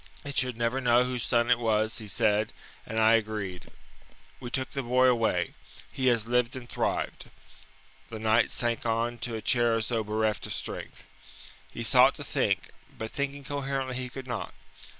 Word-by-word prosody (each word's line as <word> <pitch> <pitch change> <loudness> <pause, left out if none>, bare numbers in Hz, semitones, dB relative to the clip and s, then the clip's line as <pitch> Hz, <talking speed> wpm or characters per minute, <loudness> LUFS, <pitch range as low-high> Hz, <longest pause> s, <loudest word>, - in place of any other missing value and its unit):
It 140 -2 -6
should 125 -3 +1
never 120 +3 0
know 120 0 +4
whose 125 -1 -2
son 120 +1 +2
it 120 - +4
was, 110 -1 +1
he 110 - -7
said, 105 0 +1 0.3
and 110 - -2
I 110 +1 +6
agreed. 105 -5 -1 0.7
We 120 - -6
took 130 +1 -2
the 140 - -2
boy 125 +1 +3
away. 120 -3 +2 0.4
He 130 - -1
has 115 -3 +3
lived 125 +1 +1
and 125 -2 -7
thrived." - - -2 0.8
The 115 - -6
knight 110 +1 +3
sank 120 -1 -1
on 115 +1 -1
to 120 -2 -4
a 110 - -5
chair 120 -2 +3
as 110 -1 -1
though 115 -2 0
bereft 110 0 -1
of - - -4
strength. - - -7 0.7
He - - -5
sought - - +6
to - - -7
think, - - 0 0.3
but 110 0 -5
thinking 140 0 -3
coherently 135 -2 -3
he 125 -1 -4
could 130 +1 -8
not. 120 -3 -5
120 Hz, 180 wpm, -28 LUFS, 110-125 Hz, 0.8 s, I